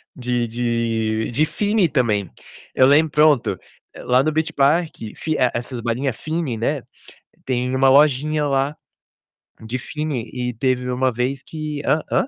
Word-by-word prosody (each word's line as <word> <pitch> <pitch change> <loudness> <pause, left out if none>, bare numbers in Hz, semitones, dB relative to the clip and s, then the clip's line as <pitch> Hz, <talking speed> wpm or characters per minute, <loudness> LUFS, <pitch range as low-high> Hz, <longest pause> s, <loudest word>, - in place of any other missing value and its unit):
de 125 -1 -1
de 115 -1 -1
de 150 +6 +2
Fini 205 +4 +1
também. 110 - 0 0.4
Eu 130 - +5
lembro 150 +3 +4
pronto, 150 -4 +3 0.4
lá 125 +1 +2
no 155 - +1
Beach 160 +1 -1
Park, 155 +4 +2 0.2
Fi 155 -1 -2 0.2
essas 120 +1 -4
balinha 125 +4 -1
Fini, 155 -2 -3
né, 130 +4 -1 0.6
tem 125 0 -1
uma 135 0 +4
lojinha 150 +2 +3
lá 140 +1 0 0.9
de 110 +3 -4
Fini. 145 -4 -4
E 125 -1 -3
teve 125 +1 -1
uma 130 +1 +1
vez 125 +3 -2
que 155 -2 -5
hã. 155 - +2
Hã? - - +2
130 Hz, 145 wpm, -21 LUFS, 120-150 Hz, 0.9 s, Eu